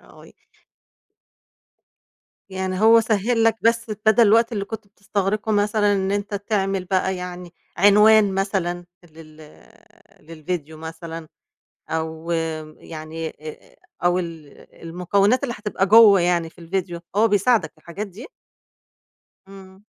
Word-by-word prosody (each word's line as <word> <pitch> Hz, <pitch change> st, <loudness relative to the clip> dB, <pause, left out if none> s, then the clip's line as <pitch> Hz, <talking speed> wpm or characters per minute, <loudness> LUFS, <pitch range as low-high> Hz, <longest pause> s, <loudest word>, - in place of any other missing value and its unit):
آه. -, -, -18 dB, 2.2 s
يعني 190 Hz, 0 st, -3 dB
هو 225 Hz, +1 st, +7 dB
سهِّل 225 Hz, +2 st, 0 dB
لك 225 Hz, 0 st, +3 dB
بس 230 Hz, 0 st, +1 dB
بَدَل 220 Hz, +1 st, +5 dB
الوقت 230 Hz, +3 st, +4 dB
اللي 205 Hz, -3 st, -3 dB
كنت 220 Hz, 0 st, -8 dB
بتستغرقه 200 Hz, +1 st, -3 dB
مثلًا 205 Hz, 0 st, +2 dB
إن 190 Hz, 0 st, -1 dB
أنت 205 Hz, +1 st, -3 dB
تعمل 195 Hz, -2 st, -2 dB
بقى 190 Hz, 0 st, 0 dB
يعني 180 Hz, -1 st, -8 dB, 0.2 s
عنوان 205 Hz, +1 st, +5 dB
مثلًا 185 Hz, -3 st, -2 dB, 0.2 s
لل 155 Hz, -2 st, -16 dB, 0.8 s
للفيديو 160 Hz, 0 st, -6 dB
مثلًا 160 Hz, 0 st, -8 dB, 0.6 s
أو 160 Hz, +1 st, -4 dB, 0.5 s
يعني 160 Hz, 0 st, -7 dB
آآ 155 Hz, 0 st, -11 dB, 0.3 s
أو 175 Hz, +1 st, +3 dB
ال 165 Hz, -4 st, -7 dB, 0.3 s
المكونات 195 Hz, +8 st, +1 dB
اللي 245 Hz, -4 st, -3 dB
هتبقى 205 Hz, -2 st, -1 dB
جوّه 210 Hz, -2 st, +7 dB
يعني 175 Hz, -2 st, 0 dB
في -, -, -29 dB
الفيديو 175 Hz, 0 st, -4 dB, 0.2 s
هو 220 Hz, +2 st, +4 dB
بيساعدك 210 Hz, +2 st, +2 dB
في -, -, -30 dB
الحاجات 170 Hz, +6 st, -7 dB
دي؟ 200 Hz, +5 st, -11 dB, 1.2 s
إمم. 195 Hz, +1 st, -15 dB
195 Hz, 120 wpm, -22 LUFS, 170-210 Hz, 2.2 s, هو